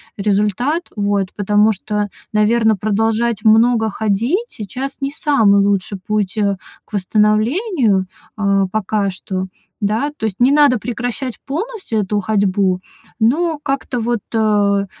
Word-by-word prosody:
результат. 210 - 0
Вот. 200 -2 -1
Потому 210 +1 +3
что, 210 +1 -3 0.2
наверное, 220 +1 +3
продолжать 220 +2 0
много 225 0 +4
ходить 230 - -1
сейчас 255 +7 -6
не 275 - -1
самый 225 -9 +3
лучший 200 0 0
путь, 210 0 -1
э, 200 -2 +1 0.3
к - - -29
восстановлению, 215 - +1 0.3
а, 195 -2 +2
пока 210 -1 0
что. 190 0 -4 0.3
Да, 220 +7 0
то - - -11
есть, 200 -4 -3
не 250 +3 +5
надо 285 -4 +4
прекращать 245 +2 -4
полностью 380 - -3
эту 205 +1 0
ходьбу, 195 -2 +1 0.4
но 305 +8 +1
как-то 275 -3 -2
вот, 235 -1 -1
э, 205 -3 +2
215 Hz, 130 wpm, -18 LUFS, 200-245 Hz, 0.4 s, не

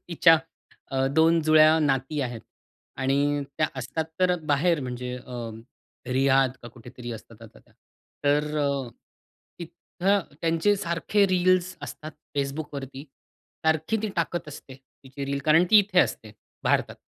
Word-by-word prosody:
तिच्या 165 -1 +5 0.5
अ, 135 0 +1
2 165 +2 +4
जुळ्या 155 +1 +6
नाती 140 0 0
आहेत 120 -4 -4 0.6
आणि 140 +2 +1 0.2
त्या - - +3
असतात 135 +6 -3 0.2
तर 180 -1 +4
बाहेर 150 +2 +2
म्हणजे 125 -1 -5
अ, 120 -2 -7 0.6
रियाध 135 0 +3
का 120 - -8
कुठेतरी 120 +1 -10
असतात 110 - -12
आता - - -14
त्या. - - -27 0.5
तर 150 +1 +1
अ, 140 -3 -1 0.7
तिथं 175 +3 -1 0.2
त्यांचे 165 +5 +2
सारखे 195 +3 +1
रील्स 185 0 +2
असतात 155 - -7 0.3
Facebookवरती. 140 -1 -4 0.6
सारखी 160 +6 +1
ती 215 - -1
टाकत 170 -1 -2
असते 140 -2 -10
तिची 135 +1 -11
रील 140 0 -2
कारण 160 +3 +5
ती 215 - +9
इथे 200 -2 +2
असते 110 - -2 0.3
भारतात - - +1
145 Hz, 135 wpm, -25 LUFS, 135-170 Hz, 0.7 s, ती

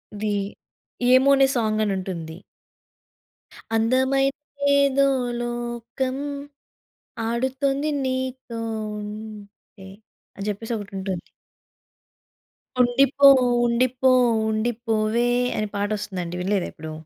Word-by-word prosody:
ఇది 210 0 -2 0.8
'ఏమోనే' 270 +1 +5
సాంగ్ 220 -2 +1
అని 205 -2 0
ఉంటుంది. 170 -4 -6 1.4
అందమైన‌దేదో 275 +3 +2 0.3
లోకం. 240 +2 -3 1.1
ఆడు‌తొంది 265 +4 0 0.2
నీతో 260 -2 -3 0.4
ఉంటే 210 -2 -10 0.5
అని 200 - -5
జెప్పేసి 225 +3 -4
ఒకటి 205 -1 -9
ఉంటుంది... 190 -2 -3 1.6
ఉండిపో 275 +3 +5 0.4
ఉండిపో 255 +2 +2 0.4
ఉండిపోవే 225 +1 0 0.3
అని 215 - -1
పాటొస్తుందండి. 200 -4 -3
వినలేదా 195 0 0
ఏప్పుడు? 160 0 -8
235 Hz, 75 wpm, -23 LUFS, 210-260 Hz, 1.6 s, ఏమోనే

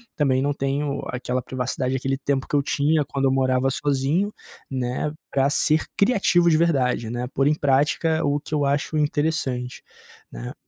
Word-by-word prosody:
também 135 -3 +2
não 145 +1 0
tenho 140 +1 -2
aquela 125 0 -2
privacidade, 130 +1 -3
aquele 135 +1 -1
tempo 135 -1 -1
que - - -2
eu 140 - +3
tinha 150 +2 +1
quando 135 -1 -2
eu 130 - +3
morava 130 0 +2
sozinho, 145 +9 0 0.4
né, 130 +3 -2 0.2
para 135 0 +2
ser 155 +2 +2
criativo 195 -6 +3
de 155 - +4
verdade, 130 -8 +1
né, 120 +1 -3
pôr 135 +1 +2
em 150 - +4
prática 150 +3 +1
o 145 0 +1
que 150 - -10
eu 145 -1 +1
acho 145 +3 0
interessante, 145 -4 -1 0.5
né? - - -7
140 Hz, 170 wpm, -23 LUFS, 130-150 Hz, 0.5 s, de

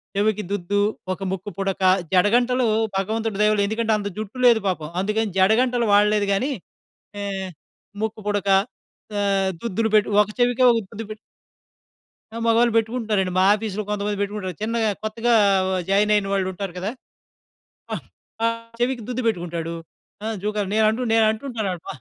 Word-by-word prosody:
చెవికి 210 +1 +1
దుద్దు, 205 0 -1 0.3
ఒక 185 - -11
ముక్కు 190 +1 -4
పుడక, 195 -1 -2 0.3
జడగంటలు 240 +7 +3 0.3
భగవంతుడు 220 +2 -2
దయవల్ల 210 -1 +3
ఎందుకంటే 220 +1 -1
అంత 205 -1 -4
జుట్టు 215 +3 -6
లేదు 235 -2 +6
పాపం! 170 -5 -2
అందుకని 210 +2 0
జడగంటలు 235 +5 +3
వాడలేదు 210 0 +4
గానీ, 255 +9 0 0.7
ఏహ్! 195 -1 -3 0.5
ముక్కు 220 0 -3
పుడక 205 -1 -1 0.7
ఆహ్, 195 -1 +1
దుద్దులు 225 0 0
పెట్టి 210 - +3
ఒక 210 - -5
చెవికే 245 +1 +2
ఒక 230 - +1
దుద్దు 225 0 -6
పెట్టి 215 - -6 1.2
ఆ! - - -8
మగాళ్ళు 230 +1 +4
పెట్టుకుంటారండి 220 -4 0
మా - - +5
ఆఫీస్‌లో 215 -1 -4
కొంతమంది 205 0 -2
పెట్టుకుంటారు. 200 -2 -3
చిన్నగా 225 0 0
కొత్తగా 230 +2 0 0.3
ఆహ్, - - -1
వ - - 0 0.2
జాయినయిన 205 0 +3
వాళ్లుంటారు 190 -1 -2
కదా! 195 +4 -2 1.0
ఆ! - - +1 0.5
ఆహ్, 230 0 0 0.2
చెవికి 245 -2 0
దుద్దు 250 0 -2
పెట్టుకుంటాడు. 170 -4 -3 0.5
ఆ! - - -3 0.2
జూకాలు 210 -2 -1
నేను 220 0 +4
అంటు 240 +2 -2
నేనంటుటాను 220 -1 +1
అడప 175 -2 -9
210 Hz, 145 wpm, -23 LUFS, 195-225 Hz, 1.2 s, లేదు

